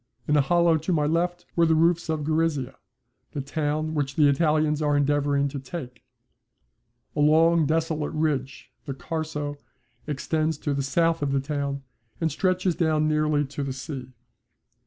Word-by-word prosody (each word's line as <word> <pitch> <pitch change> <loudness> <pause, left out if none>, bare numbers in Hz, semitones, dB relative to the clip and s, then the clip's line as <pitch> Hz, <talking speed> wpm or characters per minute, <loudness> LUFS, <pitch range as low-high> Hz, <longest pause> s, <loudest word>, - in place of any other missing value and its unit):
In 150 - +3
a 145 - +5
hollow 170 +3 +3
to 160 +4 -3
my 150 -4 +2
left 175 +3 0
were 170 -1 +4
the 160 - +4
roofs 165 +1 +2
of 155 -2 -1
Gorizia, 155 -4 0 0.6
the 145 - -2
town 155 +2 -2
which 140 -3 -2
the 150 -2 +5
Italians 150 +1 +2
are 145 -1 +2
endeavouring 145 0 +2
to 140 - -5
take. 130 -3 -8 1.1
A - - -3
long 160 +1 +4
desolate 160 -1 -1
ridge, 145 -4 -2
the 135 -3 -5
Carso, 150 -1 -4 0.5
extends 155 +2 -1
to 145 -1 -2
the 140 - -1
south 165 +4 +1
of 140 -1 0
the 140 - +2
town, 140 -1 -3 0.4
and 160 -1 0
stretches 185 +3 +1
down 155 -2 +1
nearly 150 -1 +1
to 140 +1 -6
the 135 -1 -3
sea. 130 -1 -7
150 Hz, 160 wpm, -25 LUFS, 140-160 Hz, 1.1 s, a